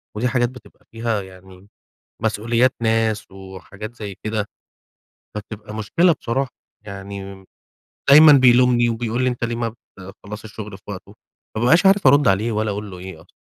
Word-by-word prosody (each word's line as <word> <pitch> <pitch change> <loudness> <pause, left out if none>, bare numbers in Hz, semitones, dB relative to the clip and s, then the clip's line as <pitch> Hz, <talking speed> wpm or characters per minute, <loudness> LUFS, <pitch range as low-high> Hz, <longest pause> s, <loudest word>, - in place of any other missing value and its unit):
ودي 120 +4 0
حاجات 120 -1 +1
بتبقى 125 -3 -17
فيها 115 -2 -2
يعني 95 0 -15 0.6
مسؤوليات 115 +4 +2
ناس 110 -2 0
وحاجات 95 +3 -10
زي 100 -4 -7
كده. 110 -1 -2 0.9
فبتبقى 105 0 -8
مشكلة 165 +12 +2
بصراحة 130 +3 -2 0.4
يعني، 100 -1 -8 0.7
دايمًا 150 +2 +9
بيلومني 125 -2 +5
وبيقول 115 +2 -2
لي 130 - +2
أنت 120 -1 -5
ليه 120 0 -1
ما 115 -1 -3 0.2
بتخلّصش 100 +3 -10
الشغل 105 -2 -8
في - - -28
وقته. 100 +1 -9 0.4
ما 110 - -2
بابقاش 165 +10 +4
عارف 195 -6 +5
أرُد 140 0 +5
عليه 105 +4 +2
والّا 105 0 -1
أقول 105 0 -6
له 90 - -9
إيه 90 -3 -9
أصلًا. 90 - -22
110 Hz, 155 wpm, -21 LUFS, 100-120 Hz, 0.9 s, دايمًا